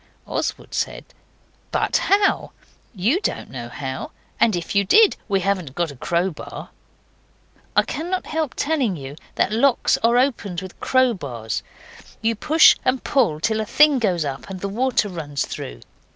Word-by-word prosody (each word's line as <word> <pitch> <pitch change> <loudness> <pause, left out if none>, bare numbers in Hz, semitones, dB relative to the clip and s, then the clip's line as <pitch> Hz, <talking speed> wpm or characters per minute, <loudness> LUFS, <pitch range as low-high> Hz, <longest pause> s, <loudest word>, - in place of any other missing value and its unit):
Oswald - - -3
said, - - -2 0.7
'But - - +1
how? 400 0 +2 0.4
YOU 225 - +2
don't - - -3
know 120 -2 -6
how. 130 +1 -5 0.3
And 220 -4 +4
if 170 -1 -4
you 200 - +4
did 420 - +5
we 195 -3 +1
haven't 180 -8 -1
got 170 -3 -1
a - - -11
crowbar.' 170 +5 -3 1.0
I - - +5
cannot 360 +4 -3
help 315 -3 -2
telling 280 - 0
you 140 -2 -8 0.2
that - - +1
locks 240 +3 +3
are 235 +1 +3
opened 230 -9 0
with 185 0 -10
crowbars. 145 - 0 0.6
You 225 +1 +1
push 310 +8 +6
and 255 0 0
push 170 - +1
till 220 -1 +1
a - - 0
thing 300 +4 +5
goes 180 -8 +1
up 135 +4 -5
and 190 -1 -6
the 200 - -3
water 240 +1 +1
runs 150 -7 -3
through. - - -7
200 Hz, 155 wpm, -22 LUFS, 165-260 Hz, 1.0 s, push